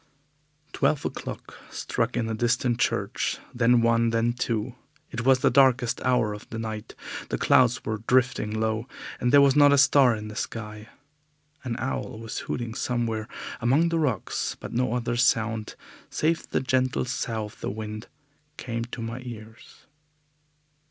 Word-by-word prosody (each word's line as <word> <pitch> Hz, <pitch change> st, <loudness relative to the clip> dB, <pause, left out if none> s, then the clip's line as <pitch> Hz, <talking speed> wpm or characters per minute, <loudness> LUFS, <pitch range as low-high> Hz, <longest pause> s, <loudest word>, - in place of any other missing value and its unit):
Twelve 150 Hz, -, +1 dB
o'clock -, -, -6 dB
struck 120 Hz, +2 st, -2 dB
in 120 Hz, -, 0 dB
the 115 Hz, -, -2 dB
distant 120 Hz, +1 st, +1 dB
church, -, -, 0 dB, 0.2 s
then 120 Hz, 0 st, +4 dB
one, 115 Hz, 0 st, +3 dB
then 115 Hz, +1 st, +1 dB
two. 120 Hz, -1 st, -2 dB, 0.4 s
It 120 Hz, -, -3 dB
was 130 Hz, -1 st, +5 dB
the -, -, +4 dB
darkest 125 Hz, -2 st, +3 dB
hour 125 Hz, -4 st, +2 dB
of 105 Hz, +2 st, -10 dB
the 115 Hz, -, -5 dB
night. 110 Hz, -1 st, -5 dB, 0.3 s
The -, -, -1 dB
clouds 125 Hz, -1 st, +3 dB
were 110 Hz, -1 st, -3 dB
drifting 125 Hz, -3 st, +2 dB
low, 110 Hz, +2 st, -1 dB, 0.3 s
and 125 Hz, -, +1 dB
there 145 Hz, 0 st, +8 dB
was 140 Hz, -1 st, +5 dB
not 145 Hz, -1 st, +7 dB
a 140 Hz, -, +5 dB
star 135 Hz, -2 st, +5 dB
in 105 Hz, 0 st, -6 dB
the 105 Hz, -, -8 dB
sky. 105 Hz, -1 st, -6 dB, 0.7 s
An 120 Hz, -3 st, -3 dB
owl 130 Hz, -3 st, -3 dB
was 115 Hz, 0 st, -5 dB
hooting 120 Hz, -2 st, -3 dB
somewhere 115 Hz, -3 st, -2 dB, 0.3 s
among 140 Hz, +8 st, +3 dB
the 165 Hz, 0 st, 0 dB
rocks, 125 Hz, -, -1 dB
but -, -, -8 dB
no 120 Hz, -1 st, 0 dB
other 120 Hz, -1 st, -1 dB
sound, 115 Hz, -3 st, +1 dB, 0.3 s
save 165 Hz, +2 st, 0 dB
the -, -, 0 dB
gentle 130 Hz, 0 st, +1 dB
sough 115 Hz, -3 st, -2 dB
of 105 Hz, -, -13 dB
the -, -, -2 dB
wind, 110 Hz, +1 st, -6 dB, 0.5 s
came 115 Hz, -1 st, -4 dB
to 120 Hz, -1 st, -7 dB
my 115 Hz, +2 st, -5 dB
ears. 110 Hz, -2 st, -11 dB
120 Hz, 160 wpm, -26 LUFS, 110-130 Hz, 0.7 s, there